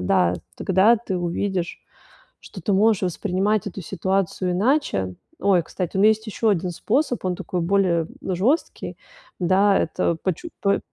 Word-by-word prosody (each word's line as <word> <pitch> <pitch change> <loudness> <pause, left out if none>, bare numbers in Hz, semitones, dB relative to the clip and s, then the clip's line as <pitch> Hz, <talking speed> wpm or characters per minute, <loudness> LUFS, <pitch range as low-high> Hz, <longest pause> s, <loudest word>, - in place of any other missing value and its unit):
да, 90 -1 +2 0.2
тогда 195 +5 +4
ты 210 -4 -4
увидишь, 175 +1 -2 0.6
что 190 - -11
ты 205 - -1
можешь 210 +1 +3
воспринимать 190 +3 0
эту 195 0 -6
ситуацию 190 +1 -1
иначе. 180 - +1 0.3
Ой, 190 -3 +4
кстати, 180 +2 -4
у - - +2
меня 210 - +7
есть 220 +1 -3
еще 215 +1 0
1 180 -2 0
способ, 245 - 0
он 180 -1 0
такой 180 - -4
более, 170 -3 +2
м, 190 - -2
жесткий. 255 - -1 0.4
Да, 195 +3 +4
это 165 +1 0
почу 190 - -2
по 200 0 +2
190 Hz, 155 wpm, -23 LUFS, 175-205 Hz, 0.6 s, меня